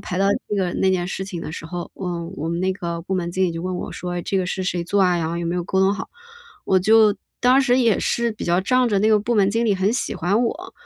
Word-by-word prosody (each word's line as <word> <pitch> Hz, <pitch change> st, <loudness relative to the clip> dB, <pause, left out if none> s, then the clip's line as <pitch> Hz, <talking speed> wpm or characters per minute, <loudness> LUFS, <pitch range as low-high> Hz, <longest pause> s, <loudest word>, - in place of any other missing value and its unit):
排 180 Hz, -, -5 dB
到 195 Hz, -, +3 dB, 0.2 s
这 210 Hz, -, -1 dB
个 185 Hz, -3 st, 0 dB
那 190 Hz, -, +2 dB
件 175 Hz, -1 st, 0 dB
事 190 Hz, -, -4 dB
情 180 Hz, -3 st, -6 dB
的 -, -, -6 dB
时 160 Hz, -, -7 dB
候， 175 Hz, +1 st, -6 dB
我 175 Hz, -3 st, -4 dB
我 160 Hz, +2 st, -3 dB
们 170 Hz, +1 st, -2 dB
那 190 Hz, +1 st, +1 dB
个 170 Hz, -3 st, -5 dB
部 190 Hz, +2 st, -3 dB
门 175 Hz, -2 st, -1 dB
经 190 Hz, +1 st, +1 dB
理 175 Hz, -, 0 dB
就 165 Hz, -, -5 dB
问 185 Hz, 0 st, -3 dB
我 -, -, -5 dB
说： 180 Hz, 0 st, -5 dB
“哎， 175 Hz, -, -3 dB
这 195 Hz, -, -2 dB
个 185 Hz, -, -1 dB
是 185 Hz, +1 st, -3 dB
谁 180 Hz, -1 st, -1 dB
做 200 Hz, +3 st, +1 dB
啊， 180 Hz, -1 st, +3 dB
然 160 Hz, -1 st, -1 dB
后 170 Hz, -, -3 dB
有 170 Hz, -, -3 dB
没 170 Hz, -, -1 dB
有 175 Hz, -, -1 dB
沟 190 Hz, -, 0 dB
通 190 Hz, +1 st, +4 dB
好。” -, -, -6 dB, 0.6 s
我 190 Hz, -, +4 dB
就 215 Hz, +1 st, +5 dB, 0.2 s
当 255 Hz, +2 st, +5 dB
时 255 Hz, -1 st, +3 dB
也 230 Hz, -5 st, +3 dB
是 235 Hz, 0 st, 0 dB
比 215 Hz, -, -7 dB
较 175 Hz, +1 st, +2 dB
仗 255 Hz, +5 st, +2 dB
着 205 Hz, -3 st, +1 dB
那 215 Hz, -, +3 dB
个 215 Hz, -1 st, +5 dB
部 235 Hz, +3 st, -1 dB
门 200 Hz, -2 st, +4 dB
经 230 Hz, +3 st, 0 dB
理 210 Hz, -3 st, +2 dB
很 195 Hz, +3 st, +1 dB
喜 255 Hz, -, -2 dB
欢 200 Hz, +8 st, +1 dB
我， 360 Hz, +10 st, -4 dB
190 Hz, 325 characters per minute, -22 LUFS, 175-215 Hz, 0.6 s, 就